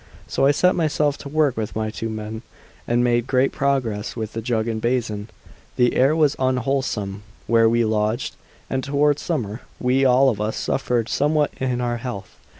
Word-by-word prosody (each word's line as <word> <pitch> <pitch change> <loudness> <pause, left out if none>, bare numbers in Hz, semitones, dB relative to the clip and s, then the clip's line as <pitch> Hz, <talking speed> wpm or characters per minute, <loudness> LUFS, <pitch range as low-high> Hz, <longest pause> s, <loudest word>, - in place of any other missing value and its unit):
So 135 - +1
I - - +6
set 180 +5 +3
myself 150 -3 +1
to 140 - -8
work 150 -3 +2
with 110 -2 -4
my 110 0 -2
two 115 +1 -4
men, 110 0 -5 0.5
and 120 +1 +2
made 120 0 +1
great 130 0 +2
progress 125 -7 -1
with 110 -2 -5
the 115 - -3
jug 115 -1 -1
and 110 -1 -2
basin. 115 -3 -1 0.5
The 125 -1 +3
air 135 +4 +4
was 150 -3 +3
unwholesome 130 -6 -1 0.2
where 115 -1 +4
we 115 0 +2
lodged, 110 +3 -1 0.3
and 130 0 -2
toward 145 +1 +2
summer 120 - -3 0.2
we 130 +2 +2
all 130 +1 +5
of 105 -4 -2
us 105 +1 -2
suffered 120 -4 0
somewhat 150 +1 +1
in 125 -2 -1
our 120 -1 -1
health. 115 -6 -7
125 Hz, 180 wpm, -22 LUFS, 110-135 Hz, 0.5 s, I